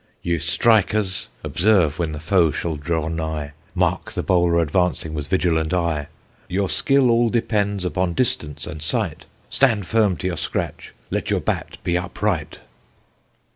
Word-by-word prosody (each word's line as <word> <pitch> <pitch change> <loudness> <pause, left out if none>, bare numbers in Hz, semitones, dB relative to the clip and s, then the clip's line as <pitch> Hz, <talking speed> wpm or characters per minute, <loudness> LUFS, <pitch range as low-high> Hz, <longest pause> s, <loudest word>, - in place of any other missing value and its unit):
Ye 85 -2 0
strikers, 100 +3 +2 0.2
observe 90 -6 +2
when 85 -2 0
the 75 - -5
foe 85 +1 +3
shall 80 +1 -2
draw 80 +1 -2
nigh, 80 -3 -3 0.2
Mark - - 0
the - - -2
bowler 85 -2 +3
advancing 85 0 0
with 75 -2 -4
vigilant 80 -2 +1
eye: 85 -5 0 0.4
Your 95 +1 -1
skill 135 -3 +3
all 115 0 +3
depends 100 -4 0
upon 90 -1 -1
distance 75 - -1
and 75 0 -7
sight, 80 - -2 0.2
Stand 110 -8 +3
firm 105 -2 +2
to 90 - -7
your 90 -2 -1
scratch, 80 - -4 0.2
let - - -2
your - - +2
bat - - -3
be 85 0 +1
upright. 90 -3 -2
85 Hz, 150 wpm, -22 LUFS, 80-100 Hz, 0.4 s, foe